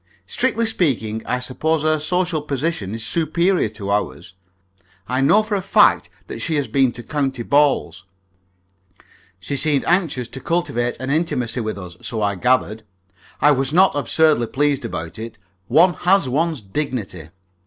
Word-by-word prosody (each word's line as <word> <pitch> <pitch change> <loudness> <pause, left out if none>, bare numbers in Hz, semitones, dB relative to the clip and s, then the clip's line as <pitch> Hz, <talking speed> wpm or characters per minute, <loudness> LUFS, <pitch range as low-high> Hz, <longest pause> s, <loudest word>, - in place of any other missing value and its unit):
Strictly 230 - 0
speaking, 115 - -1
I 125 - 0
suppose 150 +5 -1
her 155 0 +2
social 175 +1 0
position 140 - -3
is 115 -1 -3
superior 170 - +1
to 100 -2 -6
our 105 0 0
own. - - -15 0.8
I 130 +2 0
know 205 +11 +4
for 215 0 -5
a 200 - 0
fact 185 - +3 0.2
that - - -7
she 160 - -1
has 145 -2 0
been 135 -3 +2
to 120 0 -9
county 135 -4 -2
balls. 145 +2 +1 1.3
She 100 +9 -4
seemed 140 0 0
anxious 165 -9 0
to 135 - -8
cultivate 120 -9 -1
an 130 +1 -3
intimacy 130 -7 -1
with 110 -3 -3
us, 90 -3 -9
so 115 - -4
I 100 0 +1
gathered. 110 +1 +1 0.6
I 150 - +6
was 135 -1 0
not 190 +3 +5
absurdly 145 -3 +2
pleased 145 -1 0
about 80 -3 -6
it. 115 0 -7 0.3
One 175 +2 +5
has 185 -4 +2
one's 155 +1 -1
dignity. 100 - -4
140 Hz, 160 wpm, -20 LUFS, 115-160 Hz, 1.3 s, I